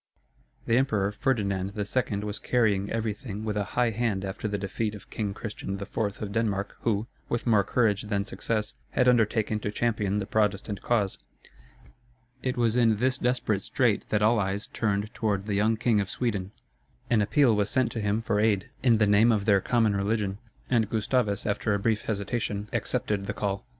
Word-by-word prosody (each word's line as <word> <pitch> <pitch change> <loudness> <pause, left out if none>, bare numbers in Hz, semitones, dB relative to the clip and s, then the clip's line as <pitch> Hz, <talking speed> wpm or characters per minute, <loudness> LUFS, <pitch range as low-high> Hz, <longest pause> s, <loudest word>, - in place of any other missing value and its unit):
The 115 - +3
Emperor 105 -7 +1
Ferdinand 100 -6 -1
II. 105 0 -1
was 105 0 -3
carrying 105 -5 +1
everything 110 -1 -3
with 105 -2 -2
a 105 - +1
high 120 -2 +3
hand 105 -3 -1
after 95 +3 -4
the 100 -1 -1
defeat 105 +2 -3
of 105 - -13
King 100 -3 -3
Christian 100 -3 -5
IV. 100 - -8 0.3
of 100 - -4
Denmark, 100 -2 -1
who, 110 -2 0 0.2
with 120 - -1
more 110 -4 +4
courage 105 -4 +1
than 100 -2 -2
success, 110 -1 -2 0.2
had 125 - +3
undertaken 110 -3 +2
to 105 - -3
champion 105 -2 0
the 100 - -1
Protestant 105 -1 0
cause. 105 -5 0 1.2
It 130 0 -2
was 115 -2 +2
in 115 -3 +4
this 130 +4 +1
desperate 125 -5 0
strait 115 0 0
that 105 -1 +1
all 110 +2 +4
eyes 100 +1 -1
turned 105 -1 -2
toward 100 -3 -1
the 105 - -2
young 110 +3 +2
King 115 -2 +2
of 100 - -4
Sweden. 100 -6 -2 0.6
An 115 -3 +4
appeal 120 +3 +4
was 105 -1 +1
sent 130 -1 +1
to 115 - -3
him 105 +2 0
for 105 -2 0
aid, 105 -3 +1
in 120 -3 +4
the 105 - +4
name 105 +3 +5
of 105 -3 +1
their 100 -3 +4
common 115 -3 +2
religion; 100 0 -1 0.3
and 115 -5 +2
Gustavus, 110 -2 0
after 105 0 0
a - - -1
brief 110 +1 0
hesitation, 105 -1 -2
accepted 100 -2 -1
the 100 - -2
call. 100 -2 -3
105 Hz, 185 wpm, -27 LUFS, 100-115 Hz, 1.2 s, name